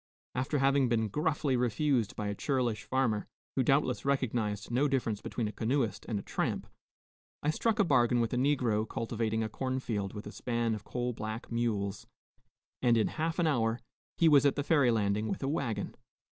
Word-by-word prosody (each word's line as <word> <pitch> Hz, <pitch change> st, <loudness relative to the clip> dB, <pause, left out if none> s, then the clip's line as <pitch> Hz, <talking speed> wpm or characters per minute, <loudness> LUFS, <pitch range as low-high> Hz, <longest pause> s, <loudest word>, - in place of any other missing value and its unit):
After 130 Hz, +4 st, -1 dB
having 135 Hz, -1 st, +3 dB
been 110 Hz, -2 st, +1 dB
gruffly 150 Hz, +1 st, 0 dB
refused 125 Hz, -1 st, +1 dB
by 105 Hz, -, -3 dB
a 100 Hz, -, -1 dB
churlish 120 Hz, -2 st, -1 dB
farmer, 120 Hz, -6 st, 0 dB, 0.3 s
who 135 Hz, -, +3 dB
doubtless 130 Hz, -1 st, +2 dB
recognized 120 Hz, -7 st, -1 dB
no 130 Hz, +5 st, +3 dB
difference 120 Hz, -6 st, -1 dB
between 115 Hz, -3 st, -3 dB
a -, -, -4 dB
canoeist 115 Hz, +1 st, -1 dB
and 110 Hz, -, 0 dB
a 100 Hz, -, -4 dB
tramp, -, -, -2 dB, 0.8 s
I 150 Hz, -, +3 dB
struck 220 Hz, +7 st, 0 dB
a 210 Hz, -, +5 dB
bargain 125 Hz, -7 st, +3 dB
with 115 Hz, 0 st, 0 dB
a -, -, +2 dB
negro 125 Hz, -5 st, +1 dB
cultivating 110 Hz, -1 st, -1 dB
a -, -, -1 dB
cornfield 115 Hz, -5 st, -3 dB
with 105 Hz, -, -6 dB
a 105 Hz, -, -7 dB
span 115 Hz, -1 st, -1 dB
of 105 Hz, -1 st, -5 dB
coal 125 Hz, 0 st, -2 dB
black 110 Hz, +1 st, -6 dB
mules, 105 Hz, -4 st, -1 dB, 0.7 s
and 120 Hz, -2 st, +4 dB
in 110 Hz, -, +2 dB
half 165 Hz, +1 st, -2 dB
an 175 Hz, -, +2 dB
hour 115 Hz, -6 st, +1 dB, 0.4 s
he 165 Hz, -, +5 dB
was 145 Hz, -3 st, +6 dB
at 140 Hz, -2 st, +3 dB
the 145 Hz, -, -1 dB
ferry 145 Hz, -5 st, +4 dB
landing 105 Hz, -1 st, +1 dB
with 110 Hz, -, -3 dB
a -, -, 0 dB
wagon. 120 Hz, -7 st, -2 dB
120 Hz, 185 wpm, -31 LUFS, 110-135 Hz, 0.8 s, was